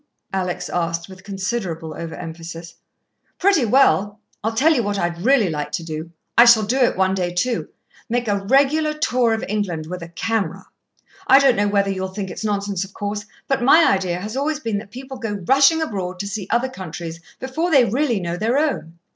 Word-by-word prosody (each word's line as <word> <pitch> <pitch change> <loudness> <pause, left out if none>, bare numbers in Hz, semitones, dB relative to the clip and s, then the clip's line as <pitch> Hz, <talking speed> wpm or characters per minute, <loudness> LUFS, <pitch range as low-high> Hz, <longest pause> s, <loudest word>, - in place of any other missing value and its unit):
Alex 185 -2 -2
asked, 170 -1 -2
with 190 -1 -13
considerable 190 -5 -4
over 165 +1 -6
emphasis. 165 0 -8 0.6
"Pretty 370 -9 +3
well. 210 -4 +3 0.2
I 220 - +1
tell 270 +9 +3
you 255 - +1
what 205 -2 -2
I'd 175 -2 -2
really 250 -1 +4
like 150 -3 -3
to 170 - -2
do 160 0 -6 0.3
I 235 - +8
shall 235 -2 +7
do 235 +6 0
it 245 -6 +3
one 190 0 +2
day, 180 -2 -1
too 235 +7 -1 0.4
make 240 0 -1
a 200 -1 0
regular 300 +4 +3
tour 250 -5 +1
of 225 0 -1
England, 190 -6 -2
with 180 +2 -6
a 170 - -7
camera. 225 +5 -2 0.6
I 270 - +8
don't 275 -2 +5
know 205 +1 +1
whether 200 -1 +1
you'll 190 0 -3
think 190 0 -5
it's 175 - -6
nonsense, 200 -2 -1
of 195 0 -12
course, 205 0 -4 0.2
but 270 -2 0
my 310 +7 +6
idea 185 -2 -1
has 210 +5 -6
always 295 +3 -1
been 225 -7 -2
that 205 - -11
people 260 +4 -8
go 225 -4 -4
rushing 275 - +5
abroad 185 -9 -4
to 200 - -4
see 200 -1 -5
other 240 +3 +1
countries 170 -6 -7 0.2
before 290 +7 -2
they 275 -7 +5
really 245 -1 0
know 175 -1 -3
their 225 +7 +1
own. 215 - -1
205 Hz, 200 wpm, -21 LUFS, 180-255 Hz, 0.6 s, I